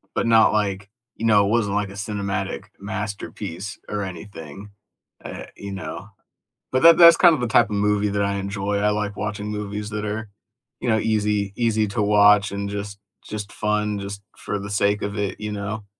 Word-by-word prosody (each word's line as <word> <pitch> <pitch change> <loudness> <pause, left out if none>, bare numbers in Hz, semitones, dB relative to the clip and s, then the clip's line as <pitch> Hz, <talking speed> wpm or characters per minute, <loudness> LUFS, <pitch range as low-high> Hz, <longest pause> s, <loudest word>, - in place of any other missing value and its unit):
but - - 0
not 115 -1 +5
like 100 -1 -1 0.3
you 115 - -3
know, 105 -2 +5
it - - 0
wasn't 105 -3 +1
like 105 -1 0
a - - -10
cinematic 100 -1 -3
masterpiece 100 -1 -5
or 105 -1 -2
anything, 95 0 -9 0.5
eh, - - -7
you 100 0 -8
know. 95 - -6 0.6
But 130 - +1
that 165 0 +9
that's 170 -1 +9
kind 175 -2 +7
of 130 - -5
the 120 - 0
type 115 0 +4
of 105 - -2
movie 105 0 +1
that 100 0 0
I 100 0 0
enjoy. 100 +1 -2
I 105 +1 +2
like 105 -1 -2
watching 105 -1 -4
movies 105 0 -4
that 105 0 -3
are, 105 +1 -4 0.5
you - - -3
know, 110 - +3
easy 105 -2 0
easy 110 -3 +1
to 105 - -1
watch 105 -1 +5
and 100 0 -3
just 100 0 -5 0.2
just 105 -1 -6
fun 105 -1 -1
just 100 0 -6 0.2
for 105 - -4
the 100 +1 -7
sake 100 +1 +1
of 100 +1 -4
it, 100 -1 -2
you 105 0 -4
know? 105 +1 -5
105 Hz, 195 wpm, -23 LUFS, 100-105 Hz, 0.6 s, that